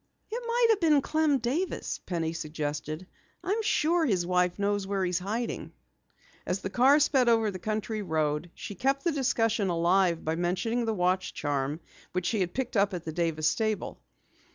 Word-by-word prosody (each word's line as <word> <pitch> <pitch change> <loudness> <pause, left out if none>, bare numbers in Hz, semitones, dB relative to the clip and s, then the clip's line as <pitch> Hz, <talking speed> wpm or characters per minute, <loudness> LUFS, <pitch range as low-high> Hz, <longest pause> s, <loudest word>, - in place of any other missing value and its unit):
"It 475 +2 -3
might 475 +1 +3
have 440 -3 +4
been 310 -4 +4
Clem 310 -2 +2
Davis," 270 +10 -2
Penny 165 -2 -1
suggested. 155 +1 -4 0.4
"I'm 405 +5 0
sure 345 -5 +2
his 190 - +1
wife 180 0 +1
knows 200 -1 0
where 195 -1 0
he 180 - 0
is 180 - +1
hiding." 220 +6 -4 0.7
As 180 +2 -2
the 190 - -4
car 265 +6 +5
sped 265 -4 +3
over 225 -2 +3
the 185 - -7
country 215 +1 -2
road, 155 -2 -1
she - - -7
kept 270 +7 0
the 340 - +2
discussion 230 -7 +1
alive 175 0 +2
by 160 - 0
mentioning 190 +8 0
the 225 -1 -1
watch 185 0 0
charm 145 +2 -2 0.3
which 180 -1 -1
she 215 +3 0
had 180 -2 -1
picked 255 -2 -2
up 200 -1 +2
at 175 - -6
the 160 - -3
Davis 160 -2 0
stable. 215 +2 -1
200 Hz, 180 wpm, -28 LUFS, 175-250 Hz, 0.7 s, car